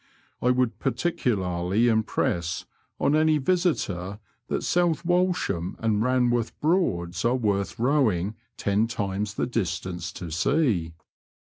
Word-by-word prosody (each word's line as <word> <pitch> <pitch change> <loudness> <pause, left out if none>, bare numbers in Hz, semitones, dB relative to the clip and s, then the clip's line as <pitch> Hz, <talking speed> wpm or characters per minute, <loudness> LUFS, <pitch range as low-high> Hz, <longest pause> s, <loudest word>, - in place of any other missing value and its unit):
I 125 - +2
would 125 -4 +1
particularly 105 - 0
impress 90 -6 0 0.3
on 145 - +3
any 155 0 +4
visitor 130 - 0 0.3
that - - -2
South 175 -2 +1
Walsham 175 - 0
and 110 -2 +1
Banworth 120 -1 +1
Broads 90 - 0
are 120 +2 +3
worth 100 -5 -1
rowing 115 - +2 0.2
ten 105 +3 +1
times 100 -2 -3
the - - 0
distance 90 -5 -3
to 85 -3 -7
see. 90 - +1
110 Hz, 115 wpm, -26 LUFS, 90-135 Hz, 0.3 s, any